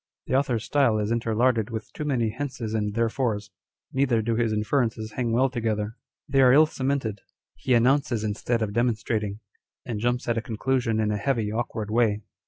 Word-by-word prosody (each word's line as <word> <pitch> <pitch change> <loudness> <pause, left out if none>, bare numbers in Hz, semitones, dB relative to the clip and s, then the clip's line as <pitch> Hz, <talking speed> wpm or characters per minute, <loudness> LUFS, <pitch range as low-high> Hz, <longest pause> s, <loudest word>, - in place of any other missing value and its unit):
The - - -4
author's 130 -5 +1
style 135 -7 +2
is 105 +1 -1
interlarded 115 0 +1
with 110 -2 -6
too 150 - -5
many 120 -6 +1
hences 125 -3 -4
and 105 -2 -1
there/ores; 115 -2 -1 0.4
neither 130 -4 +2
do 115 +1 0
his 115 -1 +1
inferences 110 0 0
hang 120 +1 -2
well 125 +4 +3
together. 110 -4 -2 0.3
They 135 -1 +3
arc 130 0 +7
ill 155 +2 +7
cemented. 130 -8 -2 0.4
He 130 - +1
announces 125 -1 +2
instead 110 +2 -1
of 100 -2 -3
demonstrating; 110 -2 -1 0.4
and 110 -3 -3
jumps 120 +2 -1
at 120 -1 +1
a - - -4
conclusion 115 +1 -1
in 105 -1 +1
a 105 - 0
heavy, 110 -1 0
awkward 110 -2 -3
way. 110 -2 +2
115 Hz, 180 wpm, -25 LUFS, 110-130 Hz, 0.4 s, arc